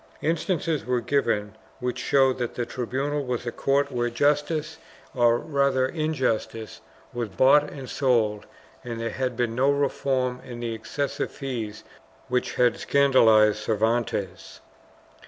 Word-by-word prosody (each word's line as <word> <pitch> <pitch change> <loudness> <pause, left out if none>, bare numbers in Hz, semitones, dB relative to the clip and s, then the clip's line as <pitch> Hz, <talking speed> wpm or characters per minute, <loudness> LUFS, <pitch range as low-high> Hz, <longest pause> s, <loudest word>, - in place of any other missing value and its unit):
Instances 165 -1 0
were 125 -1 0
given 110 -5 0 0.2
which 125 -1 -3
showed 135 -2 +2
that 120 -1 -3
the 120 - -2
tribunal 135 +5 -2
was 125 -2 -3
a 120 - -2
court 140 +2 +1
where 120 -1 0
justice 150 +5 0 0.2
— - - -24
or 120 -2 +4
rather 140 -2 +1
injustice 130 - -2 0.2
— - - -28
was 120 -2 -3
bought 140 +8 +4
and 135 -3 -8
sold 115 -7 +1 0.4
and 115 -1 -5
there 115 -1 -2
had 125 -1 -3
been 120 -2 0
no 130 +4 +2
reform 135 -3 0
in 120 -2 -8
the 120 -1 -3
excessive 140 +5 -3
fees 120 -7 -5 0.5
which 125 0 -1
had 125 -1 +2
scandalized 115 -7 +4
Cervantes. 110 -3 -1
125 Hz, 140 wpm, -25 LUFS, 115-140 Hz, 0.5 s, or